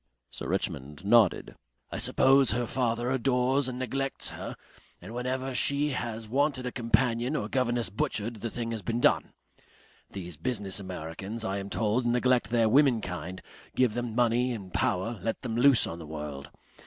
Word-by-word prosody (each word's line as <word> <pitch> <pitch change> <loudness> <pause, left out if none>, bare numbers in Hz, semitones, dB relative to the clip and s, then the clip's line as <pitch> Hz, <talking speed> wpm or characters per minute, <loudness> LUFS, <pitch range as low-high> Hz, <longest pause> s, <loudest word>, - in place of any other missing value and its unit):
Sir - - -5
Richmond 75 +6 -3
nodded. 105 - +4 0.4
"I - - -3
suppose 135 -1 +4
her 120 +1 0
father 120 0 0
adores 130 +1 +2
and 125 - -5
neglects 135 +2 -2
her, - - -6 0.4
and 95 +6 -10
whenever 130 +2 -2
she 140 +4 +2
has 115 -4 -4
wanted 135 +2 +1
a 125 - -2
companion 120 +2 +1
or - - -1
governess 120 -5 0
butchered, 110 +2 -2
the 115 +3 -4
thing 115 0 -4
has 110 -2 -3
been 115 +3 -2
done.... - - +2 0.8
These 90 -5 -7
business 100 - -1
Americans, 95 +4 -5
I 95 +1 -1
am 100 0 -6
told, 115 +4 0
neglect 125 -2 +2
their 115 -1 +3
womenkind, 110 - +1 0.3
give 125 -4 +3
them 120 -1 -3
money 120 +1 +2
and 95 -5 -8
power, 110 +5 0
let 115 +4 -3
them 115 -3 -3
loose 125 0 +5
on 85 - -6
the 80 - -9
world.... 75 -2 -6
115 Hz, 165 wpm, -28 LUFS, 100-125 Hz, 0.8 s, loose